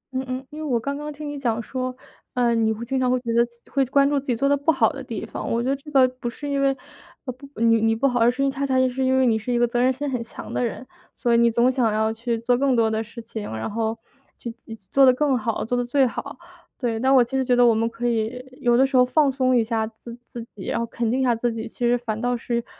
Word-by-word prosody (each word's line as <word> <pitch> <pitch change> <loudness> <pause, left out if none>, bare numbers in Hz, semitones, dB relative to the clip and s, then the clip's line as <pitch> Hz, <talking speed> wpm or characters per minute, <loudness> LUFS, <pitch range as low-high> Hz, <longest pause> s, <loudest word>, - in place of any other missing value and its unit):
嗯 260 - -1
嗯， 255 +1 -4
因 305 - -8
为 - - -5
我 255 -6 0
刚 280 +4 -3
刚 300 +1 -5
听 295 +1 -8
你 290 -1 -5
讲 230 -4 -1
说， 255 +1 -4 0.4
呃， 240 -1 +2
你 225 -1 +2
会 225 +2 -4
经 265 +1 -1
常 255 -1 +1
会 255 0 +2
觉 230 -2 -3
得 235 - +5
自 235 0 -22
会 275 -1 +2
关 275 +2 +3
注 285 -1 +1
自 275 - -13
己 245 - +1
做 275 +4 +1
得 285 - +4
不 285 +3 +2
好 275 - +2
的 - - -7
地 - - -5
方。 - - -6
我 235 - +1
觉 - - -2
得 275 - +2
这 280 +2 -12
个 265 -3 +5
不 255 -1 -6
是 290 +4 -8
因 280 -1 0
为 270 -1 +2 0.5
不 265 +2 -8
你 230 -1 +4
你 225 0 +2
不 275 +5 +2
好， 245 -2 0
而 230 - +5
是 275 +3 0
恰 275 +1 -4
恰 270 -1 0
是 260 +1 -2
因 260 0 +2
为 260 - +4
你 225 -2 +2
是 245 +3 -4
一 240 - +1
个 240 - +3
责 240 +1 0
任 255 - +4
心 280 +2 -3
很 245 -2 -2
强 230 - -9
的 - - 0
人， 240 +2 -4 0.3
所 240 -3 0
以 - - +5
你 235 0 +5
总 240 +3 +3
想 245 -4 +1
要 220 +1 0
去 230 +1 -2
做 245 +2 +1
更 275 -2 +2
多 225 -2 +2
的 220 0 -1
事 230 +1 -11
情， 220 -2 -6
然 110 - -4
后 225 0 -2 0.4
去 235 - -6
自 230 -1 -11 0.2
做 275 - +5
得 255 - +7
更 280 -1 +2
好、 225 0 -2
做 245 - -1
得 245 - 0
最 265 +3 +2
好。 280 +3 -5 0.4
对， 230 -3 -2
但 265 +2 +2
其 235 - -21
实 265 - 0
我 - - +1
觉 250 -1 +2
得 245 0 +5
我 235 - +5
们 225 +1 0
可 240 +1 -3
以 230 +2 -1 0.2
有 240 -1 +3
的 265 - +5
时 270 0 -3
候 250 - +7
放 275 +2 +3
松 255 -1 +1
一 230 - +3
下 220 -1 -1
自 230 +1 -11
自 240 -3 -8
己， 195 - -9
然 - - -1
后 235 - -1
肯 230 0 -2
定 260 +3 0
一 - - +2
下 245 -2 +3
自 235 +1 -1
己， 225 +1 -5
其 - - -28
实 245 0 +3
反 220 -2 -4
倒 245 0 0
是， 235 0 -3
245 Hz, 325 characters per minute, -23 LUFS, 230-265 Hz, 0.5 s, 得